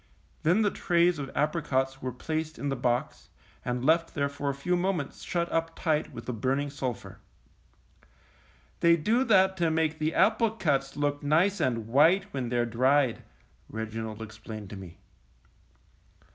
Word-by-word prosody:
Then 180 +8 +3
the 205 - +2
trays 175 -2 +2
of 135 -1 -4
apricots 135 -3 0
were 130 - -3
placed 155 +5 -4
in 140 - -3
the 135 - -1
box, 120 -1 -2 0.3
and 125 0 -2
left 165 +2 +2
there 140 -1 0
for 140 0 -3
a - - 0
few 175 +6 0
moments 175 -5 -2
shut 170 -1 -1
up|tight 165 -1 -1
with - - -9
the 125 - -3
burning 135 +5 -1
sulphur. 130 -6 -5 1.6
^^They 170 0 +5
do 235 +7 +3
that 190 -5 +4
to 170 -2 +2
make 160 0 0
the 155 +1 0
applecuts 190 -11 +2
look 145 0 0
nice 165 +8 +2
and 115 -4 0
white 170 - +4
when 130 -3 -2
they're 120 -1 +1
dried," 130 +2 +2 0.5
Reginald 110 0 -5
explained 110 -2 -9
to - - -6
me. 95 -3 -10
145 Hz, 150 wpm, -28 LUFS, 125-170 Hz, 1.6 s, ^^They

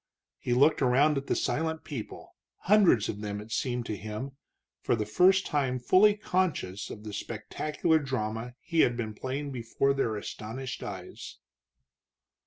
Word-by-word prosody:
He 120 - -1
looked 145 +5 +4
around 135 +3 +4
at 140 - -11
the - - +1
silent 160 0 -1
people, 130 -8 -7 0.3
hundreds 190 - +4
of 105 - -5
them, 105 -1 -4
it 105 +2 -10
seemed 125 0 -1
to 110 - -3
him, 110 +7 -6 0.5
for - - +1
the 110 -2 -2
first 185 - +4
time 135 -4 0
fully 190 +11 +5
conscious 180 - -1
of 105 - -9
the 105 -1 -7
spectacular 155 +9 -1
drama 125 -3 -3
he 165 -1 -2
had 120 -5 +4
been 110 -3 -3
playing 135 +5 -4
before 130 +2 0
their 125 -5 0
astonished 115 +4 -6
eyes. 95 -3 -8
125 Hz, 155 wpm, -29 LUFS, 110-150 Hz, 0.5 s, fully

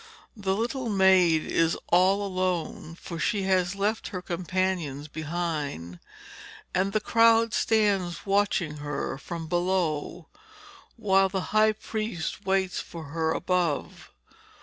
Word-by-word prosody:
The 195 -3 -1
little 240 +3 -2
maid 190 -5 +4
is 165 0 +1
all 190 +3 +4
alone, 180 -4 -2
for 170 -2 -7
she 200 +2 0
has 185 -1 +1
left 210 +3 -1
her 185 - -5
companions 175 -5 -2
behind, 150 - -4 0.7
and 190 +2 +1
the 215 - +1
crowd 230 +1 +4
stands 200 -6 +1
watching 195 -6 +1
her 145 -2 -4
from 165 0 -6
below, 175 -2 -1 0.7
while 195 -4 +3
the 190 0 -2
high 215 0 +5
priest 215 -3 -4
waits 190 -1 +1
for 160 -3 -8
her 160 -1 0
above. 175 -4 -1
185 Hz, 120 wpm, -27 LUFS, 165-200 Hz, 0.7 s, high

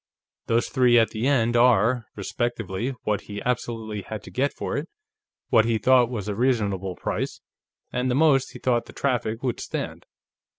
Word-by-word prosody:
Those 115 +1 +2
three 125 -3 +4
at 115 -1 +4
the 115 +3 -1
end 120 -4 +2
are, 120 -1 +4
respectively, 115 +2 -3
what 105 -1 0
he 105 0 -7
absolutely 115 -4 -2
had 105 +1 -7
to - - -11
get 140 +2 0
for - - -4
it, 145 +4 -3 0.6
what 110 -1 +5
he 115 -1 +1
thought 125 +1 +4
was 105 -5 -4
a 105 - -1
reasonable 100 -6 0
price, - - -3 0.5
and 125 0 0
the 125 - +1
most 140 -3 +3
he - - -8
thought 120 -2 0
the - - -12
traffic 120 -3 -1
would 125 -3 -1
stand. - - -5
120 Hz, 175 wpm, -25 LUFS, 110-125 Hz, 0.6 s, what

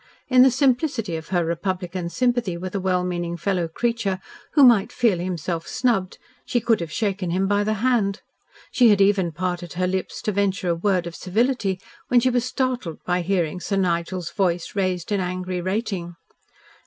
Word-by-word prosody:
In 255 -1 +6
the 265 - +8
simplicity 255 - +1
of 160 0 -6
her 175 -3 +1
republican 180 +1 -3
sympathy 240 -5 0
with 185 +1 -6
a 200 - -1
well 185 -1 +1
meaning 175 -1 -3
fellow 175 0 0
creature 225 +2 -1 0.4
who 290 - +6
might 230 -6 +6
feel 215 -8 +2
himself 170 -1 -3
snubbed, 235 -7 0 0.3
she 240 - 0
could 230 -1 +2
have 170 -2 -5
shaken 195 -3 -1
him 185 +3 +1
by 205 +1 +2
the 215 +1 0
hand. 215 -6 +1 0.5
She 245 -2 +5
had 205 -2 +4
even 195 -3 +3
parted 175 +1 -3
her 180 +1 0
lips 185 +1 -3
to 215 - 0
venture 195 -2 0
a 170 - +2
word 180 0 +1
of 170 -1 -6
civility 205 -1 0 0.3
when 245 - +5
she 255 +2 +2
was 245 -1 +1
startled 250 - -2
by 180 0 +1
hearing 175 -2 -1
Sir 195 +2 -2
Nigel's 175 -1 -1
voice 175 -2 -1
raised 185 -2 -1
in 205 - +2
angry 185 0 -3
rating. 185 -2 -3
190 Hz, 180 wpm, -23 LUFS, 175-220 Hz, 0.5 s, the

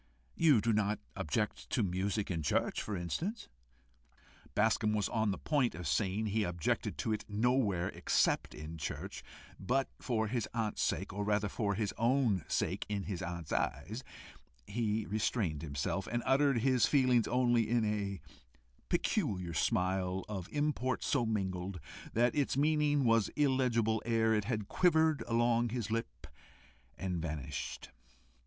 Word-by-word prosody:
You 150 -9 +5
do 115 +2 +2
not 105 0 +1 0.2
object 105 +7 -2
to 120 - +1
music 100 +2 -1
in 85 -2 -1
church, 75 - 0
for 105 -3 -3
instance?" 170 - -3 1.1
Bascombe 110 0 +2
was 105 -2 +1
on 110 -2 0
the 95 - -1
point 140 -5 +1
of 90 -3 -5
saying 95 +9 0
he 110 +1 0
objected 85 -4 -1
to 110 - -1
it 105 - -3
nowhere 105 -4 +1
except - - +1
in 75 +2 -7
church, 75 - -5 0.4
but 130 +8 0
for 110 -3 0
his 115 -1 -2
aunt's 110 -2 -1
sake, 95 +4 -1
or 105 +1 -2
rather 105 0 +1
for 100 -1 -1
his 105 -1 -1
own 115 - +2
sake - - -1
in 100 -2 -2
his 95 -3 -4
aunt's 85 -2 -5
eyes, 105 - -2 0.6
he 110 - -1
restrained 100 -6 -1
himself, 75 +5 -2
and 120 +1 -2
uttered 135 -3 +3
his 130 -1 +4
feelings 130 -5 +3
only 120 -2 +2
in 115 -1 +2
a 100 -2 -2 0.7
peculiar 90 -3 0
smile, 90 +4 0
of 95 -4 -5
import 145 -4 0
so 125 -5 +1
mingled, 95 -3 -2 0.3
that 120 +2 +3
its 140 -2 0
meaning 150 -1 +3
was 115 -3 +4
illegible 125 -6 +2
ere 115 -1 +2
it 105 -2 +1
had 110 -4 -2
quivered 160 -4 +3
along 120 0 +2
his 115 -2 -3
lip 115 - -3 0.7
and 90 -3 -2
vanished. 75 -4 -5
110 Hz, 150 wpm, -33 LUFS, 95-120 Hz, 1.1 s, You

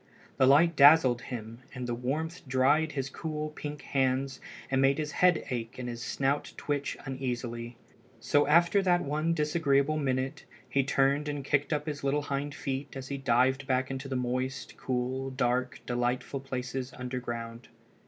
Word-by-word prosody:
The 130 - +5
light 160 +5 +5
dazzled 140 -4 +7
him, 115 -2 -7 0.2
and 125 -1 -4
the 120 - -2
warmth 150 +8 -3
dried 145 +5 +3
his 135 -2 -2
cool, 155 +1 -4
pink 150 -1 -7
hands 135 0 0 0.3
and 135 0 +3
made 135 +1 +4
his 150 -1 -2
head 180 -1 +3
ache 115 -2 -4
and 125 -1 -5
his 120 -1 -5
snout 135 +2 -1
twitch 145 -1 -2
uneasily. 120 -3 -4 0.4
So 145 0 +2
after 170 +6 +5
that 175 -2 +3
one 155 +3 0
disagreeable 150 -2 +2
minute 130 -2 -1 0.2
he 135 +2 +1
turned 140 +2 +2
and 145 -2 -4
kicked 145 +2 +1
up 150 -1 0
his 150 -3 -5
little 140 +1 +1
hind 145 +1 -3
feet 135 -1 -4
as 130 0 -7
he 140 -1 -3
dived 130 +1 +2
back 130 0 +1
into 135 +1 -5
the 135 - -3
moist, 130 +1 -2
cool, 130 +1 -2
dark, 125 -1 -1
delightful 125 +2 -1
places 130 -1 -4
underground. 120 -2 -5
135 Hz, 165 wpm, -29 LUFS, 125-145 Hz, 0.4 s, dazzled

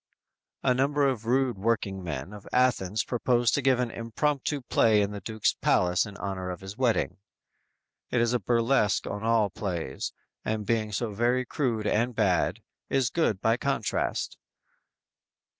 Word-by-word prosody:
"_ - - -66 0.6
A 125 - +6
number 140 +2 +2
of 115 -4 -2
rude 125 -3 +1
workingmen 95 - -2
of 105 -2 -11
Athens 110 -5 +2
propose 120 -1 +1
to 145 - +1
give 130 -1 +3
an 125 -2 -1
impromptu 140 +5 -1
play 110 -3 +3
in 100 - -2
the 100 -1 -6
Duke's 110 +2 0
palace 90 +2 +2
in 100 -1 -10
honor 95 -2 -4
of 90 0 -6
his 95 +1 -8
wedding. 115 -7 +1 0.9
It 125 - +1
is 120 +1 +2
a 125 - +2
burlesque 115 -1 +2
on 105 - -4
all 110 -3 +2
plays, 85 -10 -4 0.3
and 110 -1 -2
being 110 -1 0
so 110 +1 -2
very 120 +4 +1
crude 120 -6 -1
and 120 +3 +1
bad, 95 -6 +1 0.3
is 130 -2 +1
good 110 - +1
by 115 +1 +3
contrast! 135 -7 -1
115 Hz, 160 wpm, -27 LUFS, 100-125 Hz, 0.9 s, A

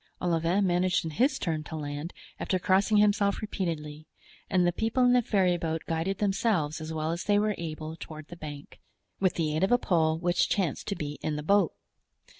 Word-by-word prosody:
Olivain 175 +3 +1
managed 180 0 +1
in 160 - -3
his 265 - +2
turn 160 -3 -2
to 160 - -7
land, 145 +2 -5 0.3
after 185 - 0
crossing 195 +4 +3
himself 205 -1 +3
repeatedly; 155 -8 -4 0.4
and 180 -2 +3
the 175 - +3
people 225 +7 +1
in 245 - +5
the 250 - +5
ferryboat 175 -6 0
guided 165 +4 -1
themselves 195 -7 0
as 155 +1 -5
well 155 0 -2
as 170 +1 -4
they 205 0 +3
were 210 +1 +2
able 160 -1 -5
toward 155 -2 -9
the 175 - -8
bank, 150 -3 -9 0.4
with 185 -2 +2
the 155 -2 0
aid 160 - 0
of 195 - +2
a 245 - +6
pole 160 -8 +1
which 175 +1 +1
chanced 185 -9 -1
to 200 - -1
be 150 -3 -5
in 155 - -2
the 150 - -4
boat. 195 -1 +3
175 Hz, 200 wpm, -28 LUFS, 155-200 Hz, 0.4 s, a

